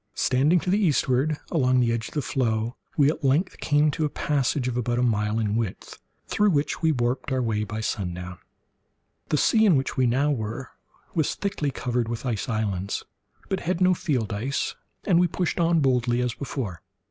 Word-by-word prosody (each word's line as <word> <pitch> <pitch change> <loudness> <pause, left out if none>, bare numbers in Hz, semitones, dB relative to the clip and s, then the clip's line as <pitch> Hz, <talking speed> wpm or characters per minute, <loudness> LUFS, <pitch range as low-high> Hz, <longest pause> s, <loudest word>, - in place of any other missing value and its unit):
Standing 145 +7 +3
to 180 - -1
the 200 - +3
eastward 145 -2 +2
along 130 -5 +3
the 120 -1 +2
edge 115 -1 -2
of - - -13
the 150 - 0
floe, 115 -3 -1 0.2
we 145 0 +5
at 160 - -8
length 145 +8 +1
came 150 0 +3
to 155 - -2
a 150 - +1
passage 140 -3 0
of 125 - -2
about 120 0 0
a 125 - +2
mile 105 -2 +1
in 105 -2 0
width, 115 -4 -4 0.3
through 210 0 +2
which 150 -5 0
we 160 -1 +3
warped 125 0 -1
our 130 - +1
way 110 -2 0
by 105 +1 -4
sundown. 90 -4 -4 0.9
The 150 - +2
sea 220 +8 +4
in 195 -7 +5
which 135 -1 -1
we 130 -1 +3
now 135 +5 +2
were 115 0 -4 0.4
was 160 -3 0
thickly 195 -8 -2
covered 125 -3 -2
with 120 +2 -4
ice 120 -1 -2
islands, 100 -4 -2 0.4
but 190 - -1
had 180 0 -1
no 185 0 +5
field 130 - -1
ice, 125 +7 -2 0.3
and 175 -4 +3
we 180 - +4
pushed 175 +1 -2
on 165 -1 +3
boldly 125 -3 +2
as 125 -1 0
before. 120 - -5
130 Hz, 195 wpm, -25 LUFS, 115-150 Hz, 0.9 s, we